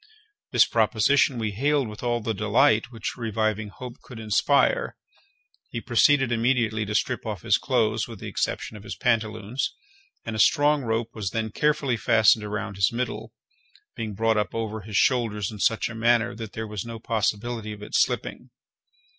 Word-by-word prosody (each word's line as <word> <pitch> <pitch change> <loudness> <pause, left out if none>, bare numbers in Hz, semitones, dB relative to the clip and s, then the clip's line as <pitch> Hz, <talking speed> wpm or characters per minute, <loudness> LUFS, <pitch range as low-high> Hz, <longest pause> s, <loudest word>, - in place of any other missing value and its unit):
This - - +5
proposition 120 +4 +2
we 110 -2 -2
hailed 140 +5 +1
with 105 +1 -9
all 120 -1 0
the 110 +1 -2
delight 110 +2 +2
which 115 -3 -5
reviving 110 -2 -1
hope 120 +4 -10
could 125 -3 -11
inspire. 140 - +2 0.7
He - - -4
proceeded 135 -4 +3
immediately 115 -3 +1
to 105 - -3
strip - - 0
off - - -5
his - - +3
clothes 110 0 0
with 115 -2 -9
the - - -8
exception - - -3
of 105 - -10
his 105 0 -7
pantaloons; 110 0 -1 0.5
and 115 - -4
a - - -4
strong 150 +3 +4
rope 115 -1 -2
was 105 -4 -3
then 110 +1 -3
carefully 140 -2 +1
fastened 110 -2 +4
around 105 -1 -4
his 95 -2 +3
middle, 115 -2 -4 0.6
being 110 -3 -5
brought 110 +1 +1
up 105 0 -1
over 110 -1 -3
his 100 0 -3
shoulders 110 -6 +1
in 105 - -9
such 110 +2 +1
a 115 - -7
manner 120 +1 +2
that 110 -2 -8
there 110 - -4
was 105 -3 -5
no 115 -1 -7
possibility 110 0 -2
of 105 -1 -9
its - - +1
slipping. - - -2
110 Hz, 175 wpm, -25 LUFS, 105-120 Hz, 0.7 s, This